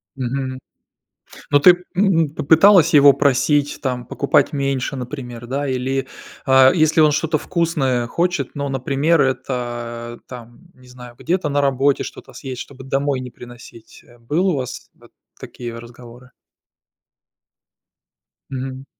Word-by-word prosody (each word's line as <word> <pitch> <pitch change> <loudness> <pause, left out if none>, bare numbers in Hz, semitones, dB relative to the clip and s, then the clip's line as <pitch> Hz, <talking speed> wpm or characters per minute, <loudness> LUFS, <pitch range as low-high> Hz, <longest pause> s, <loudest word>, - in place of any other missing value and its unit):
Мгм. 130 0 -4 0.9
Ну 145 0 +4
ты, 180 +3 +5
м, 180 -5 +2
попыталась 165 +3 +5
его 145 -1 +8
просить, 145 +1 +1
там, 125 -3 -3
покупать 140 0 +1
меньше, 135 -2 -2
например, 125 -2 -7
да, 140 +4 -3
или, 130 +1 -2 0.4
а, 130 -1 +6
если 155 -2 +2
он 150 -1 +5
что-то 155 +1 0
вкусное 150 -9 -1
хочет, 170 -2 -1
но, 140 -1 -3
например, 140 +5 +1
это, 120 -3 -3
там, 120 -2 -12
не 130 0 -20
знаю, 125 -1 -12
где-то 175 -1 -1
на 145 0 0
работе 140 0 +1
что-то - - -10
съесть, 130 -2 -7
чтобы 130 -1 -10
домой 135 0 -1
не 125 -1 -8
приносить, 120 -1 -14
э. 120 0 -20
Был 155 +11 -1
у 170 - +1
вас, 125 -1 -6
вот, - - -20 0.3
такие 120 -1 -8
разговоры? 120 +1 -14 2.2
Мгм. 130 0 -6
135 Hz, 135 wpm, -19 LUFS, 125-145 Hz, 2.2 s, его